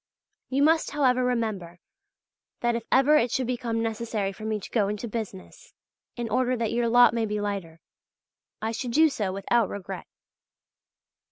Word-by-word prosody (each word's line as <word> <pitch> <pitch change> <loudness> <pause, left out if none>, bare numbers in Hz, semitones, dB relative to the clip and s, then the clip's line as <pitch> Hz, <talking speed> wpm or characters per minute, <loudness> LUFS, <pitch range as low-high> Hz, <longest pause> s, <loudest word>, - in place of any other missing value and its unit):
You 275 +2 +2
must, 320 +2 +3
however, 255 -3 +2
remember 215 -8 -2 0.8
that 240 0 +2
if 235 -1 -4
ever 280 +3 +5
it 245 -3 +2
should 260 +2 -1
become 235 -2 -2
necessary 225 -3 -2
for 215 +3 -9
me 215 -1 -1
to - - -10
go 210 -4 +2
into 210 +3 -4
business, 220 - -7 0.4
in 240 -1 -3
order 250 +2 +1
that 230 -2 -1
your 235 0 +1
lot 240 0 +6
may 230 -1 0
be 210 0 -2
lighter, 195 -6 -4 0.8
I 220 - 0
should 235 +1 -4
do 315 +3 +5
so 210 -9 -2
without 200 +3 +1
regret. 190 -2 -7
230 Hz, 165 wpm, -26 LUFS, 205-250 Hz, 0.8 s, lot